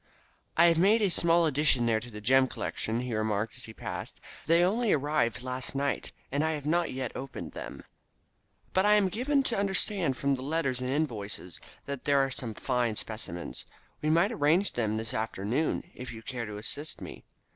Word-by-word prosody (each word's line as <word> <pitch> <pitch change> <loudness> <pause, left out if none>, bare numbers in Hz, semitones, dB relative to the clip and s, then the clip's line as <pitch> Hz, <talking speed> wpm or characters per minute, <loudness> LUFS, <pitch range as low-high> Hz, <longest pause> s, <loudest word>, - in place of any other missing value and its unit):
"I 170 - +7
have 170 0 +5
a 210 0 +4
small 170 -1 +3
addition 145 -5 +4
there 115 -2 +3
to 120 - -9
the 105 -2 -8
gem 130 +4 +5
collection," 115 -2 -3
he 125 -2 -3
remarked 110 0 -1
as - - -7
he 110 - -9
passed. - - -6 0.3
"They 165 +2 +5
only 215 +4 +2
arrived 140 -5 +1
last 130 +1 -4
night, 140 0 -1 0.2
and 140 +3 +1
I 160 0 +1
have 145 -2 -5
not 170 +3 +2 0.3
opened 135 +1 -6
them - - -7
yet, - - -13 0.9
but 190 - +4
I 210 +1 +6
am 200 -3 +3
given 270 +8 +1
to 235 -6 -1
understand 195 - +1
from 140 0 +1
the 130 - -2
letters 135 -3 -1
and 125 - -2
invoices 110 - -2 0.3
that 140 -2 -5
there 145 -1 +4
are 135 0 +2
some 115 -4 -5
fine 120 -3 0
specimens. 105 -6 -5 0.3
We 155 - 0
might 170 +7 +4
arrange 180 0 +2
them 110 -2 0
this 110 -1 -3
afternoon, 115 - -1
if 125 -1 -7
you 115 -1 -9
care 120 -2 -4
to 105 -1 -6
assist 145 +8 -3
me. - - -9
135 Hz, 190 wpm, -29 LUFS, 115-170 Hz, 0.9 s, I